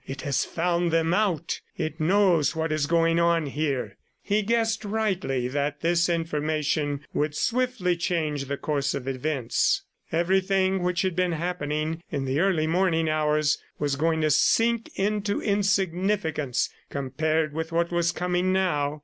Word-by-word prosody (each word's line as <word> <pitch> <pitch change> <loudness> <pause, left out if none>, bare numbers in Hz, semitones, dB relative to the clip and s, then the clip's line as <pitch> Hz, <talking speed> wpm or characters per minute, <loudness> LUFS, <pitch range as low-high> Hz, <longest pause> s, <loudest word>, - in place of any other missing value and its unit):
"It 135 0 -6
has 140 -2 0
found 175 0 0
them 165 +1 +1
out; 190 -7 0 0.2
it 160 -1 -3
knows 175 -2 +3
what 160 0 -1
is 155 -2 0
going 165 0 +3
on 170 -2 +2
here." 135 -7 -2 0.3
He 210 +1 +1
guessed 225 0 0
rightly 195 - -1
that 145 +2 -2
this 170 +1 +2
information 150 -3 -1
would 150 0 -1
swiftly 245 -5 0
change 165 -5 -1
the 140 +1 -3
course 140 -2 -1
of 130 - -5
events. 135 -1 0 0.3
Everything 190 +2 +2
which 180 0 0
had 185 -3 -1
been 180 -1 +1
happening 160 -1 -2
in 140 -4 -2
the 135 +2 0
early 175 -4 +2
morning 165 -1 +1
hours 155 -1 +1 0.2
was 145 -1 0
going 160 +2 +1
to 155 0 +2
sink 230 +5 +3
into 205 +1 0
insignificance 190 - 0 0.2
compared 155 +3 -1
with 160 +1 -4
what 170 +1 0
was 170 0 +1
coming 180 +1 0
now. 150 -6 0
165 Hz, 150 wpm, -26 LUFS, 150-185 Hz, 0.3 s, knows